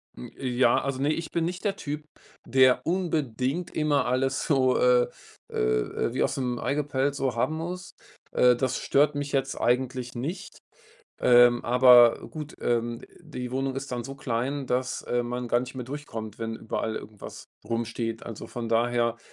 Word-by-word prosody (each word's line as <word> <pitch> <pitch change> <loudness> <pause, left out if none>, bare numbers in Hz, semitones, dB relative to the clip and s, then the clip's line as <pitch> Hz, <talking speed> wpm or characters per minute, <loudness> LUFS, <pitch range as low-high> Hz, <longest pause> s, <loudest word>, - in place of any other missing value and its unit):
Hm, - - -9
äh, 135 - -4
ja 125 -1 +3
also, 135 -1 -3
ne, 145 +2 +2
ich 165 +1 -4
bin 165 -1 0
nicht 180 +2 -4
der 195 - +1
Typ, 150 -4 -5 0.4
der 130 0 +4
unbedingt 160 -4 -1
immer 150 -3 +2
alles 130 +2 0
so 130 -3 +3
äh 125 -1 +4 0.4
äh - - -8
äh, 60 - 0
wie 130 - +1
aus - - 0
dem 125 -3 -2
Ei 140 - -1
gepellt 140 -1 0
so 135 -3 -1
haben 155 +7 0
muss. 180 +3 -6 0.4
Äh, 125 -1 +5
das 130 +1 -1
stört 145 +1 +2
mich 145 0 -3
jetzt 135 -1 -1
eigentlich 125 0 0
nicht, 170 - -5 0.6
ähm, 120 -1 +6
aber 125 -1 +6
gut, 155 -1 -8
ähm, 120 0 -1 0.2
die 125 -7 -7
Wohnung 135 0 -1
ist 135 0 -5
dann 120 -1 -3
so 135 +3 -7
klein, 135 +1 -2
dass, 125 0 -1
äh, 120 0 0
man 120 +1 -4
gar 120 +1 +3
nicht 125 +2 -7
mehr 125 - -4
durchkommt, 115 -6 -7
wenn 115 0 -3
überall 110 0 -3
irgendwas 105 -2 -9 0.2
rumsteht. 115 0 -3
Also, 115 -3 -7
von 115 -2 -5
daher 115 0 +1
130 Hz, 175 wpm, -27 LUFS, 120-140 Hz, 0.6 s, ähm